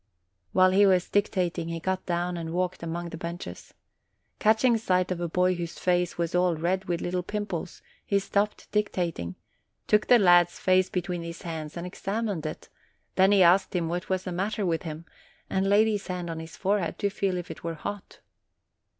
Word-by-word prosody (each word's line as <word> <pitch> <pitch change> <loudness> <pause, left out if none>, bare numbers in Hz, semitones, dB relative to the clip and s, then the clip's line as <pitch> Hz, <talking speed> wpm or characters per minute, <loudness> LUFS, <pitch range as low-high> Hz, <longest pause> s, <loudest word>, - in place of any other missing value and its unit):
While 185 0 +5
he 200 +2 +5
was 185 -2 +2
dictating, 180 -4 0
he 165 0 -3
got 190 +2 -2
down 175 0 -1
and 165 -1 -5
walked 180 0 -1
among 170 +1 -4
the 165 - -7
benches. 170 +1 -7 0.6
Catching 225 +3 +4
sight 185 -4 +1
of 175 -1 -2
a 170 - -2
boy 180 +2 +2
whose 170 -1 -5
face 180 -1 +1
was 170 -1 -1
all 180 -1 +3
red 180 +4 -1
with 175 -2 -2
little 180 +1 -1
pimples, 185 -3 -5 0.2
he 200 - +1
stopped 200 +1 -1
dictating, 175 - -1 0.5
took 210 0 +3
the 245 - +7
lad's 175 -4 +5
face 185 0 +3
between 180 -1 -2
his 170 0 -7
hands 160 -2 -5
and 170 - -4
examined 195 -2 -3
it; 155 - -7 0.5
then 190 +1 +4
he 200 -2 +6
asked 180 +3 +4
him 170 -2 0
what 175 +1 -3
was 185 -1 0
the 180 - -4
matter 200 +3 -1
with 165 -2 0
him, 160 -1 -7 0.5
and 190 +1 +1
laid 210 +2 +5
his 205 -2 -2
hand 180 -2 -3
on 165 - -5
his 160 0 -9
forehead, 195 -3 0
to 200 - 0
feel 190 -2 -1
if 175 - -5
it - - -10
were 165 0 -3
hot. 205 +5 -7
180 Hz, 195 wpm, -27 LUFS, 170-195 Hz, 0.6 s, the